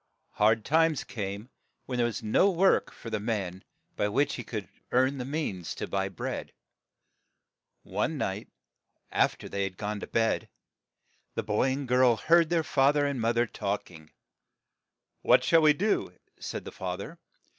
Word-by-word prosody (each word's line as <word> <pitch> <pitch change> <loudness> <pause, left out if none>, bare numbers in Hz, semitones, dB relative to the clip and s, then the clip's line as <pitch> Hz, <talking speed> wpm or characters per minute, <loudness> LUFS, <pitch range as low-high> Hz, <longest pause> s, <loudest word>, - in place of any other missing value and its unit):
Hard 110 +1 +2
times 160 -1 +3
came, 100 +2 -5 0.3
when 125 - -3
there 120 -1 +3
was 115 - -5
no 110 - +4
work 190 +1 +3
for 115 - -10
the 110 - -1
man 100 -4 -3 0.3
by 105 - +1
which 135 +7 +1
he 120 - -5
could 105 -5 -5 0.2
earn 130 +2 +2
the 125 - -3
means 130 - -3
to - - -4
buy 95 0 -1
bread. 95 - -5 1.3
One - - -2
night, - - -3 0.6
aft - - +1
er - - -6
they 100 - -3
had 95 -1 -4
gone 105 0 -3
to - - -7
bed, 115 -1 0 0.9
the - - -1
boy 105 +5 +1
and 135 0 -3
girl 125 -1 +5
heard 165 +5 +4
their 170 -2 +2
fa 135 -2 +3
ther 145 -1 +1
and 140 -4 -1
moth 115 +1 +1
er 120 - +4
talk 100 -4 -3
ing. 80 -3 -14 1.1
"What - - +5
shall 165 -1 +5
we 155 -1 +7
do?" 205 +8 -1 0.2
said - - -5
the - - -7
fa 90 -1 -4
ther. 150 - -9
120 Hz, 175 wpm, -28 LUFS, 105-145 Hz, 1.3 s, we